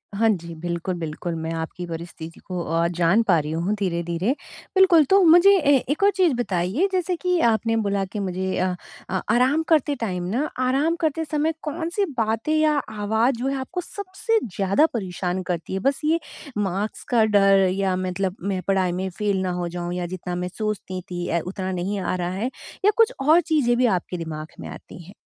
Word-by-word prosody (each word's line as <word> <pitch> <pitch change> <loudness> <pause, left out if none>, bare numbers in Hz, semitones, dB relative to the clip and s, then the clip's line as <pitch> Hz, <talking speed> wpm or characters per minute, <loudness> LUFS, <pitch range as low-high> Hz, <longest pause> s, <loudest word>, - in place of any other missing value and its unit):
हाँ 225 +2 +3
जी। 170 -5 -2
बिल्कुल, 175 +2 -3
बिल्कुल 165 +2 -4
मैं 160 0 -4
आपकी 165 +2 -5
परिस्थिति 165 0 -8
को 180 -2 -4
अ, 165 +1 +1
जान 175 +5 +2
पा 185 -6 +4
रही 150 0 -4
हूँ 170 +5 -1
धीरे-धीरे। 170 +2 -1 0.4
बिल्कुल 370 -5 +6
तो 390 0 +6
मुझे 350 +4 +7
ए 285 -5 +4
एक 300 +7 0
और 405 - +6
चीज़ 360 -6 +3
बताइए 205 - 0
जैसे 365 -1 0
कि 360 0 0
आपने 225 +1 +1
बोला 200 -2 0
कि 205 +3 -6
मुझे 190 -1 -2
अ, 185 0 0 0.5
आराम 255 +7 +3
करते 300 -3 +3
टाइम 185 -8 -3
न 290 +5 +1
आराम 275 +6 +2
करते 320 0 0
समय 305 +1 0
कौन-सी 335 +6 -1
बातें 225 +6 0
या 310 -1 +3 0.2
आवाज़ 220 +4 +1
जो 245 +3 -3
है 275 - 0
आपको 345 +8 -4
सबसे 405 +5 -2
ज़्यादा 200 - +2
परेशान 185 -3 -2
करती 175 -1 -4
है? 190 - -1
बस 275 +7 0
ये 325 +2 +3 0.4
मार्क्स 200 +1 -2
का 235 -3 +4
डर 195 -2 +4
या 190 -1 0
मतलब 185 0 -2
मैं 190 0 -2
पढ़ाई 190 -2 +2
में 185 +2 -2
फ़ेल 200 +1 -1
ना 185 -1 -1
हो 175 - -2
जाऊँ 175 0 -4
या 180 -1 -2
जितना 180 0 -5
मैं 180 0 -2
सोचती 210 -4 -3
थी 175 0 -3
अ, 170 - +1
उतना 190 0 -4
नहीं 190 +3 -2
आ 185 0 -1
रहा 175 -1 -2
है 220 +7 -2 0.3
या 415 - +6
कुछ 460 +2 +4
और 315 +5 +5
चीज़ें 295 -8 +2
भी 250 - +3
आपके 185 -4 0
दिमाग 155 -2 -5
में - - -7
आती 175 - -11
हैं? 185 +4 -13
200 Hz, 195 wpm, -23 LUFS, 180-285 Hz, 0.5 s, मुझे